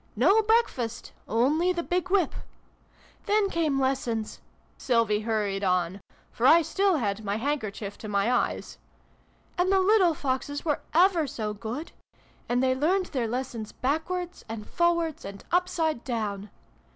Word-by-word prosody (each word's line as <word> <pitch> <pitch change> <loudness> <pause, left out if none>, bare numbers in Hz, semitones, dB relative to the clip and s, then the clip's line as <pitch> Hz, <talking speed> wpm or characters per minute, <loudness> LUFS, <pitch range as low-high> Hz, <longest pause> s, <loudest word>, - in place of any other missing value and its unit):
No 365 - +5
breakfast! 415 - 0 0.2
Only 295 +11 +2
the 345 -1 -2
big 360 +1 -1
whip! 375 -4 +2 0.9
Then 410 -1 +2
came 310 -5 +1
lessons," 250 -5 -1 0.3
Sylvie 230 -5 +1
hurried 210 -3 -1
on, 180 0 0 0.3
for 240 - +1
I 335 +3 +7
still 390 +2 +1
had 210 -4 -2
my 200 0 -1
handkerchief 220 -5 -3
to 215 - -7
my 200 +3 +1
eyes. 250 - -1 0.4
" - - -36
And 365 +2 +2
the 390 - +4
little 375 -4 +4
Foxes 285 +2 -3
were 300 -3 0
ever 345 -3 +4
so 220 -6 -4
good! 230 +9 -6 0.6
And 245 +1 +2
they 260 0 +3
learned 350 +8 +1
their 245 -4 0
lessons 235 -2 -4
backwards, 350 +6 -2
and 220 -1 -6
forwards, 340 -2 0
and 200 0 -8
upside 335 -6 0
down. 210 -5 -3
265 Hz, 145 wpm, -27 LUFS, 220-345 Hz, 0.9 s, I